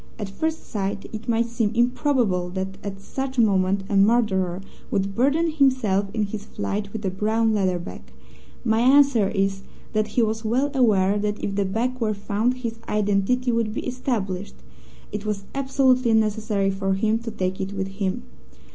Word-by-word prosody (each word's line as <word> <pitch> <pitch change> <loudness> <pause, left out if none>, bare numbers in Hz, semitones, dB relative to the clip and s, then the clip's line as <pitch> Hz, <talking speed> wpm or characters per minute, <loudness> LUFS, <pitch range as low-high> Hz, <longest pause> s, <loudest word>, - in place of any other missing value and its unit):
At 205 -3 -4
first 320 +10 -3
sight, 200 -1 -3
it 220 +2 -6
might 230 0 +2
seem 230 -2 0
improbable 240 -7 +1
that 190 0 -4
at 195 -1 -5
such 265 +6 -5
a - - +6
moment 195 -2 +2
a 205 - -1
murderer 195 -4 +3 0.3
would 195 0 -1
burden 285 +8 +2
himself 255 -10 +2
in 215 0 0
his 205 0 -4
flight 205 -1 -4
with 220 -1 -5
a 190 - 0
brown 220 +3 +1
leather 190 -4 +1
bag. 130 - -8 0.6
My 220 -1 +3
answer 260 -4 +5
is 195 -1 0 0.3
that 215 -1 +1
he 240 - +5
was 220 0 -1
well 255 +6 +1
aware 205 -6 +3
that 210 0 -2
if 200 - -1
the 200 0 0
bag 240 +6 -1
were 215 -3 0
found 210 +5 0
his 230 0 -3
identity 210 +4 +1
would 230 -2 0
be - - -3
established. 210 -7 -3 0.6
It 210 -1 -4
was 210 -2 -3
absolutely 265 -3 +2
necessary 215 -2 +1
for 195 0 -1
him 220 +3 +1
to 235 0 -6
take 185 -3 -2
it 190 +1 -3
with 195 -1 -3
him. 195 -1 -3
215 Hz, 175 wpm, -24 LUFS, 195-235 Hz, 0.6 s, a